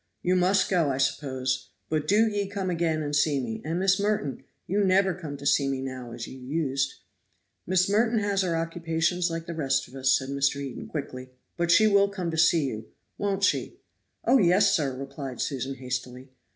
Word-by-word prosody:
You 180 +1 +2
must 185 +2 +3
go, 170 -6 +2
I 130 - -1
suppose; 130 -1 -1 0.2
but 155 -1 -1
do 215 +3 +4
ye 205 -2 -1
come 195 -2 -3
again 165 -2 0
and 145 0 -2
see 145 -1 +2
me. 115 -4 -4
And, 165 +3 -2
Miss 195 +1 +3
Merton, 205 -9 -1 0.2
you 200 +3 +1
never 190 0 +3
come 155 -6 -7
to 140 - -10
see 140 0 +3
me 135 -1 -1
now, 130 -2 -6
as 115 0 -6
you 130 - -10
used." 135 0 -1 0.7
"Miss 185 0 +3
Merton 225 +3 +2
has 205 -2 +1
her 170 -3 0
occupations 165 +1 -1
like 165 0 -4
the 170 - -5
rest 150 -5 0
of 125 - -18
us," 130 -1 +3
said 130 0 -6
Mr. 140 0 +1
Eden 140 -3 -6
quickly; 130 -4 -6 0.3
"but 170 -1 -1
she 215 +6 +6
will 200 -1 +4
come 185 -4 -3
to 160 - -4
see 160 -2 +4
you 110 -4 -5 0.3
won't 200 -1 -1
she?" - - +1 0.5
"Oh, 270 - +5
yes, 190 +2 +4
sir!" 150 -8 +1
replied 135 -2 -7
Susan, 135 -1 -2
hastily. 125 0 -6
160 Hz, 200 wpm, -27 LUFS, 135-185 Hz, 0.7 s, she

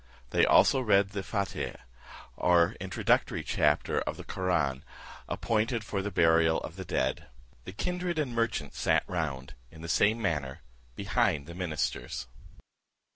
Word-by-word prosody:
They - - +4
also 135 - +5
read 100 -4 +3
the 100 0 -4
Fateah, 100 0 -3 0.5
or 90 +2 +3
introductory 95 0 0
chapter 75 0 +1
of - - -4
the - - -8
Koraun, 80 -8 -1 0.5
appointed 115 +1 0
for 100 -2 -3
the 100 - -3
burial 80 -3 +3
of 80 - -8
the 95 - -6
dead. 65 -5 -1 0.4
The - - -6
kindred 180 - -3
and 145 -6 -1
merchants 115 -11 -2
sat - - +2
round, 75 -7 -4 0.2
in 80 +3 -13
the - - -5
same 105 +7 +3
manner, 75 - -2 0.3
behind 100 - 0
the 85 - -9
ministers. 85 -4 -3
90 Hz, 140 wpm, -29 LUFS, 80-110 Hz, 0.5 s, also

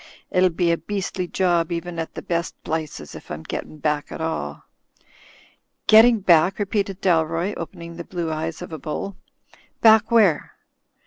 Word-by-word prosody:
"It'll 185 0 +4
be 170 0 +1
a 170 - 0
beastly 185 +1 -3
job 175 -2 +1
even 170 0 -4
at 165 - -5
the - - -6
best 170 -1 -2
plices, 155 - -4
if - - -11
I'm 80 - -6
gettin' 155 - -6
back 150 0 -1
at - - -6
all." 160 - -3 1.2
"Getting 225 0 +7
back," 175 0 +4
repeated 200 -2 -2
Dalroy, 165 +2 +1
opening 170 -2 -8
the 170 - -5
blue 170 -2 -4
eyes 160 +2 -4
of 175 - -9
a 160 - -5
bull. 190 +5 -4 0.6
"Back 220 -1 +6
where?" 210 -10 +3
170 Hz, 155 wpm, -23 LUFS, 160-190 Hz, 1.2 s, Getting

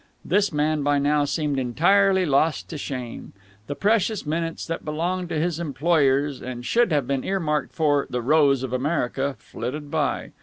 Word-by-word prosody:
This 200 +4 +2
man 150 0 0
by 145 0 +2
now 145 +1 +2
seemed 145 -2 -1
entirely 190 +9 +3
lost 150 +1 +1
to 160 - -5
shame. 125 -4 -6 0.3
The 145 - -4
precious 215 0 +1
minutes 165 +2 -3
that 165 - -4
belonged 175 +4 -2
to 160 - -1
his 170 0 -1
employers 145 -3 +1
and 120 -1 -6
should 235 - +2
have 145 -4 +1
been 135 0 -1
earmarked 160 -6 -1
for 145 -3 +2
"The 125 -1 -3
Rose 140 -1 +3
of 130 -1 -4
America" 135 0 -1
flitted 145 +7 -6
by. 155 -3 -1
150 Hz, 165 wpm, -24 LUFS, 140-170 Hz, 0.3 s, entirely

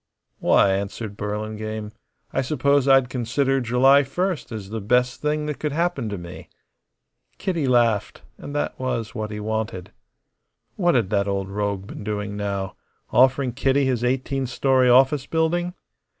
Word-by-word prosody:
"Why," 100 - +4
answered 100 +2 -3
Burlingame, 105 +1 -4 0.4
"I - - +1
suppose 140 0 +1
I'd 135 -2 +5
consider 130 +2 0
July 130 +4 +5
first 175 +5 -2
as 105 -3 -7
the 110 0 -3
best 125 +4 +1
thing 150 0 0
that 150 -1 -4
could 150 -2 -2
happen 165 -8 -1
to 100 - -4
me." 85 0 -10 0.9
Kitty 170 -7 -1
laughed; 120 -4 +1 0.2
and 145 - -8
that 145 - -2
was 115 -4 -2
what 110 -2 -4
he 105 0 -5
wanted. 105 -3 -3 0.8
What 175 -5 +2
had 115 -6 +1
that 100 -1 +1
old 100 -1 -2
rogue 100 -1 -2
been 105 - -9
doing 105 -1 -3
now 100 -2 -3 0.4
offering 130 +1 +4
Kitty 135 +2 +2
his 125 -3 0
eighteen 130 +1 -1
story 130 0 +2
office 135 +2 +4
building? 175 +2 0
125 Hz, 150 wpm, -23 LUFS, 105-135 Hz, 0.9 s, I'd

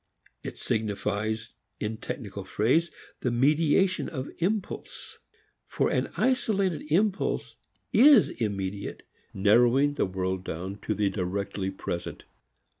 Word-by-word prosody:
It - - -7
signifies, 110 0 -2 0.3
in 110 +1 -3
technical 100 -4 -6
phrase, 130 - +2 0.3
the 125 - 0
mediation 150 +9 +2
of 130 -2 -5
impulse. 195 +3 -3 0.5
For - - 0
an - - 0
isolated 195 - +1
impulse 200 +4 +1 0.4
is 270 -3 +7
immediate, 100 -3 -4 0.3
narrowing 120 +8 +4
the 145 - 0
world 95 0 -2
down 95 +4 -5
to 110 - +1
the 100 -1 +1
directly 95 +1 -2
present. 85 -2 -5
110 Hz, 110 wpm, -27 LUFS, 100-160 Hz, 0.5 s, is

